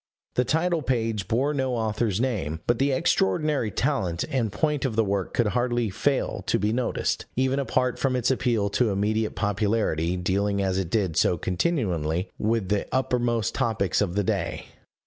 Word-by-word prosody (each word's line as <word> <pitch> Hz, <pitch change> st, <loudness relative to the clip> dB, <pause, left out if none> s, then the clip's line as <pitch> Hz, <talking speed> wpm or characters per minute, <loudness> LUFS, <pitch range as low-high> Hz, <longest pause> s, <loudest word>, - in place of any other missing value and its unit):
The 125 Hz, -, +1 dB
title 165 Hz, +4 st, +1 dB
page 115 Hz, -7 st, -1 dB
bore 135 Hz, +8 st, +1 dB
no 130 Hz, -3 st, 0 dB
author's 110 Hz, -2 st, 0 dB
name; 95 Hz, -, -1 dB
but 120 Hz, -1 st, +1 dB
the 140 Hz, +1 st, +2 dB
extraordinary 130 Hz, +1 st, +1 dB
talent 100 Hz, -, -1 dB
and 120 Hz, -6 st, 0 dB
point 150 Hz, +7 st, 0 dB
of 130 Hz, -5 st, -1 dB
the 110 Hz, -, +3 dB
work 100 Hz, -2 st, -1 dB
could 120 Hz, -3 st, +2 dB
hardly 120 Hz, -2 st, 0 dB
fail 130 Hz, +8 st, -1 dB
to -, -, +2 dB
be 105 Hz, 0 st, 0 dB
noticed, 125 Hz, 0 st, -1 dB
even 130 Hz, +2 st, +1 dB
apart 130 Hz, -2 st, 0 dB
from 135 Hz, -2 st, +1 dB
its 125 Hz, +1 st, +1 dB
appeal 120 Hz, -6 st, +1 dB
to 120 Hz, +2 st, +2 dB
immediate 105 Hz, +2 st, 0 dB
popularity, 100 Hz, -4 st, 0 dB
dealing 100 Hz, +3 st, 0 dB
as 95 Hz, -1 st, 0 dB
it 90 Hz, -4 st, -3 dB
did 95 Hz, -6 st, 0 dB
so 90 Hz, -, +3 dB
continually 90 Hz, -, -1 dB
with 110 Hz, -3 st, 0 dB
the 105 Hz, 0 st, 0 dB
uppermost 120 Hz, -3 st, 0 dB
topics 110 Hz, -8 st, 0 dB
of 95 Hz, -3 st, -1 dB
the 105 Hz, -, +2 dB
day. -, -, -2 dB
110 Hz, 170 wpm, -25 LUFS, 100-130 Hz, -, the